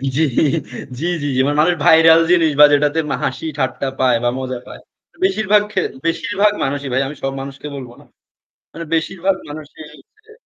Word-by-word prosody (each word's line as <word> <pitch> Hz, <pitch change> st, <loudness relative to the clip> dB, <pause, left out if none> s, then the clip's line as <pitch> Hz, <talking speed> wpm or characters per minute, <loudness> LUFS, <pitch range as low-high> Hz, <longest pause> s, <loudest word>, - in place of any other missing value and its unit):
জ্বি, 160 Hz, -, +2 dB
জ্বি, -, -, +3 dB, 0.6 s
জ্বি, 170 Hz, -, -2 dB, 0.3 s
জ্বি। 130 Hz, -, +3 dB
মানে 145 Hz, -, 0 dB
মানুষ 175 Hz, +2 st, +2 dB
viral 160 Hz, 0 st, +7 dB
জিনিস 165 Hz, -3 st, +4 dB
বা 150 Hz, -, +10 dB
যেটাতে 150 Hz, +2 st, +2 dB, 0.2 s
হাসি 130 Hz, -, -3 dB
ঠাট্টা 130 Hz, 0 st, -2 dB
পায় 125 Hz, -3 st, +3 dB
বা 120 Hz, -, +2 dB
মজা 130 Hz, -1 st, -4 dB
পায়। 65 Hz, -, -10 dB, 0.5 s
বেশিরভাগ 210 Hz, +1 st, +2 dB
খে 190 Hz, -3 st, 0 dB, 0.2 s
বেশিরভাগ 205 Hz, +4 st, +1 dB
মানুষই 140 Hz, 0 st, -3 dB
ভাই। 130 Hz, -, +2 dB
আমি 145 Hz, -, -7 dB
সব 135 Hz, -, -1 dB
মানুষকে 140 Hz, +2 st, -8 dB
বলবো 125 Hz, -3 st, -9 dB
না। -, -, -20 dB, 0.7 s
মানে 165 Hz, 0 st, -7 dB
বেশিরভাগ 185 Hz, +4 st, -1 dB
মানুষই 155 Hz, +1 st, -10 dB, 0.4 s
যে 440 Hz, -, -19 dB
155 Hz, 170 wpm, -18 LUFS, 135-175 Hz, 0.7 s, বা